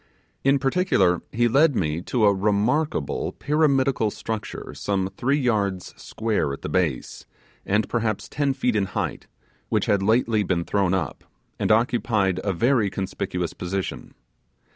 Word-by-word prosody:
In 135 +1 +4
particular, 135 - +2
he 120 +1 +2
led 140 +4 +4
me 80 -3 -1
to 110 +4 +1
a 100 - +5
remarkable 105 - 0
pyramidical 135 -6 +2
structure 110 +1 -6
some 95 -1 -2
three 135 +7 +1
yards 100 -8 -1
square 110 -10 -2
at - - -9
the - - -3
base, 80 -9 -2 0.4
and 105 +2 +1
perhaps 110 -3 -1
ten 140 -1 -1
feet 125 -3 0
in 100 -2 +2
height, - - -3 0.4
which - - +1
had 100 -1 +2
lately 110 +1 +2
been 90 -3 -1
thrown 95 -2 +1
up, 95 - -3 0.4
and - - +1
occupied 110 -4 +2
a 100 - 0
very 115 +3 +2
conspicuous 90 -2 -3
position. 95 +2 -5
105 Hz, 140 wpm, -24 LUFS, 95-125 Hz, 0.4 s, a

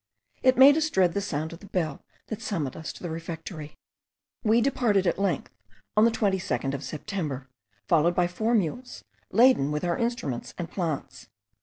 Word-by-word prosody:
It 255 -1 +4
made 280 +3 +8
us 315 0 +1
dread 185 - +3
the 200 - -1
sound 160 -4 -3
of 170 - -10
the 200 - -13
bell 165 -7 -2 0.3
that 220 0 -5
summoned 165 - -2
us 160 - -5
to - - -13
the 175 - -4
refectory. 160 -1 -7 0.7
We 225 0 +4
departed 230 -6 +2
at 175 - +1
length 200 - -1 0.4
on 215 +1 +6
the - - +6
22nd 180 - 0
of 140 0 -4
September, 150 -5 -4 0.4
followed 170 +1 +3
by 180 - +3
four 220 +7 0
mules, 230 +6 -2 0.3
laden 225 - +5
with 150 0 -2
our 175 -1 0
instruments 230 - -3
and 170 -1 -5
plants. 165 -7 -4
180 Hz, 175 wpm, -27 LUFS, 155-220 Hz, 0.7 s, made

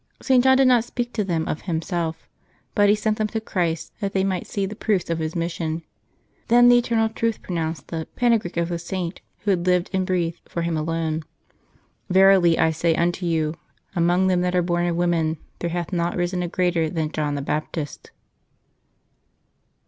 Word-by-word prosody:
St. 255 -2 +3
John 265 0 +6
did 270 -1 +5
not 245 -3 +5
speak 240 0 -4
to 215 - 0
them 170 -4 -1
of 150 - -3
himself, 165 -1 -3 0.5
but 205 -1 +4
he 205 - +5
sent 215 0 -1
them 215 - +1
to 220 +1 -3
Christ, 175 -7 -2
that 200 -2 -3
they 190 - +2
might 190 -2 -1
see 200 -2 -2
the 205 +2 -6
proofs 200 -6 0
of 165 - -1
His 160 0 -3
mission. 165 -1 -2 0.6
Then 245 +1 +6
the 245 - +7
Eternal 230 -2 +1
Truth 230 0 -2
pronounced 165 -2 -3
the 160 -1 -4
panegyric 230 -8 +1
of 170 0 0
the 170 -1 -2
Saint 175 0 -4 0.2
who 205 - +1
had 180 -1 0
lived 180 -1 +2
and 190 0 +1
breathed 175 -3 -1
for 170 - -3
Him 170 -1 -1
alone: 160 0 -1 0.9
"Verilj 190 -3 +6
I 160 - +3
say 160 +1 +1
unto 175 +2 0
you. 160 -2 0 0.4
Among 175 +2 +3
them 185 -1 +2
that 180 0 0
are 180 - +3
born 175 0 0
of 170 - 0
women 165 -2 +1 0.2
there 170 - -2
hath 175 +1 -3
not 170 0 0
risen 175 +1 -1
a 175 - -1
greater 170 -2 +1
than 155 -2 -2
John 150 -2 -1
the 140 - -2
Baptist." 150 0 -4
175 Hz, 195 wpm, -23 LUFS, 165-195 Hz, 0.9 s, the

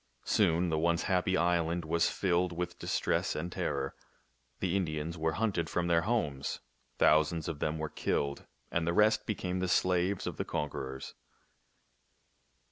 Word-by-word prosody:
Soon 85 +2 +3
the 80 -1 +1
once 85 +1 +2
happy 95 -1 +1
island 85 0 +1
was 85 +1 +2
filled 90 -1 +1
with 90 +1 -4
distress - - 0
and 85 +3 -3
terror. 70 -5 -2 0.7
The 95 0 0
Indians 80 -3 -1
were 80 -1 0
hunted 95 -6 0
from 90 - 0
their 85 -1 +3
homes. 85 - -1 0.4
Thousands 80 +1 +3
of 80 -3 -4
them 75 +1 -1
were 80 0 -2
killed, 70 -1 -2 0.2
and 85 0 0
the 85 - +2
rest 105 +3 +3
became 95 -3 -2
the 95 - 0
slaves 90 +1 +2
of - - -4
their - - -1
conquerors. 65 -2 -4
85 Hz, 150 wpm, -31 LUFS, 80-90 Hz, 0.7 s, Soon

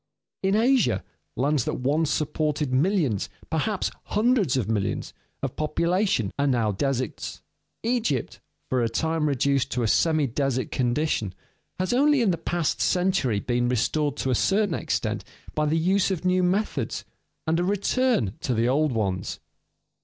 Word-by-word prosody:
In 195 +1 +2
Asia, 220 - +3 0.3
lands 140 +1 +1
that - - -1
once 145 +5 +1
supported 150 -2 -1
millions, 145 - +1 0.2
perhaps 180 +6 0
hundreds 210 - +2
of 120 - -1
millions, 105 -3 -2 0.3
of 135 - -2
population 170 - +1
are 140 - +2
now 120 -5 +2
deserts. 130 +3 -3 0.4
Egypt, 225 - -1 0.3
for 130 -1 +1
a 115 - +1
time 160 +5 0
reduced 140 -1 +1
to 120 0 0
a - - +2
semi 155 +6 +3
desert 130 0 -1
condition, 120 - 0 0.4
has 185 +5 0
only 285 0 +4
in 205 - +3
the 170 - -2
past 170 -1 -1
century 180 - +2
been 120 +2 0
restored 145 +4 0
to 130 - -1
a - - +3
certain 200 - +2
extent - - -2 0.3
by 150 0 0
the 155 +2 +2
use 185 +5 +2
of 185 -2 -3
new 185 0 +3
methods 190 +4 -1 0.4
and 165 +1 +1
a - - +1
return 205 - +1
to 125 - -1
the 115 +2 +2
old 145 +3 +2
ones. 95 -5 -2
150 Hz, 155 wpm, -25 LUFS, 125-185 Hz, 0.4 s, only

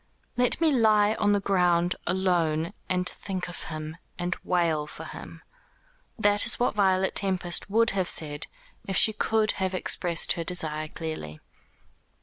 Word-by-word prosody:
"Let 245 +4 +1
me 325 -2 +3
lie 215 -4 +3
on 205 -1 +2
the 205 - +2
ground 180 -3 +2
alone, 175 -3 0 0.2
and 180 -1 0
think 185 -1 -1
of 175 - -7
him, 155 0 -6 0.2
and 175 0 -2
wail 165 -4 0
for - - -9
him." - - -10 0.7
That 205 -2 +3
is 240 - +4
what 245 - +1
Violet 190 -2 +1
Tempest 185 -2 0
would 230 +3 +2
have 190 -3 -1
said, 145 -2 +1 0.4
if 195 - -1
she 220 - +6
could 215 0 +1
have 190 0 -1
expressed 175 -2 +1
her 170 - -4
desire 155 -3 -2
clearly. 155 - -7
180 Hz, 150 wpm, -26 LUFS, 165-205 Hz, 0.7 s, she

